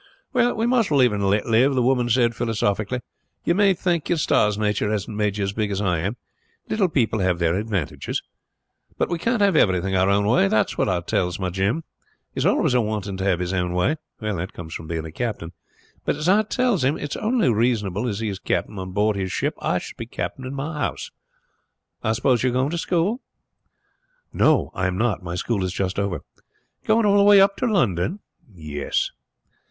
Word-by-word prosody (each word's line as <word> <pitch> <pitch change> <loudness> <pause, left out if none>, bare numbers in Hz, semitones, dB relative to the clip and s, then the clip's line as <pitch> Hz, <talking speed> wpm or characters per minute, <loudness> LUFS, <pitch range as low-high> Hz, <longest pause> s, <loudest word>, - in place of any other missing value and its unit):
"Well, 245 -1 +2
we 225 - 0
must 240 -3 +2
live 130 -6 +4
and 100 -1 0
let 105 +2 +1
live!" 125 +5 +3
the 125 - +2
woman 125 -1 +2
said 120 0 +3
philosophically. 115 0 -1 0.4
"You 170 - +2
may 195 0 +4
thank 175 -3 -1
your 175 - +2
stars 105 -8 +2
nature 105 -1 0
hasn't 105 0 -3
made 105 -1 0
you 100 - -1
as 100 0 -2
big 105 -1 -1
as 100 -1 -2
I 90 -5 +1
am. 100 +9 -3 0.5
Little 200 -4 +1
people 115 -7 +1
have 90 -2 +1
their 85 -1 +1
advantages. 100 -4 -3 0.7
But - - 0
we 170 -1 -2
can't 230 +3 +1
have 200 -1 +3
everything 95 0 +2
our 95 +1 +3
own 100 +1 +2
way. 105 -2 +4
That's 110 +2 +1
what - - +1
I 90 -2 0
tells 90 0 -1
my 95 -2 -2
Jim; 100 - 0 0.5
he - - -4
is - - +2
always - - +2
a 125 - +4
wanting 105 -3 -3
to 95 - -3
have 95 -3 +2
his 90 +1 -2
own 90 -1 -1
way. 90 - +1 0.2
That 100 -5 -3
comes 80 -2 -8
from 80 - -7
being 80 0 -3
a 80 - -7
captain; 105 -5 -4 0.5
but, - - 0
as 150 +3 -3
I 200 +4 +5
tells 220 - 0
him, 135 +4 +2
it's 145 - -4
only 225 - +1
reasonable 110 -2 0
as 105 -2 -3
he 110 - -1
is 95 -1 -5
captain 105 0 -2
on 95 0 -6
board 105 +1 +2
his 95 -2 -3
ship - - -1
I - - +1
should - - -7
be - - -6
captain 130 - -5
in 135 - -6
my 150 +2 -4
house. - - -3 0.9
I 110 -1 +1
suppose 120 +1 +2
you 130 - +2
are - - -3
going 130 +3 +1
to 170 - -2
school?" 180 +9 0 1.1
"No, 155 -3 +3
I 90 - 0
am 90 0 -2
not. 110 -2 0
My 85 -1 -5
school 100 +1 -1
is 90 - -2
just 95 +1 -2
over." 100 -4 -2 0.6
"Going 220 0 +3
all 205 0 +4
the 200 - +5
way 205 0 +7
up 200 +1 +4
to 255 - 0
London?" 125 - 0 0.3
"Yes." 75 -5 -3
110 Hz, 215 wpm, -23 LUFS, 95-150 Hz, 1.1 s, way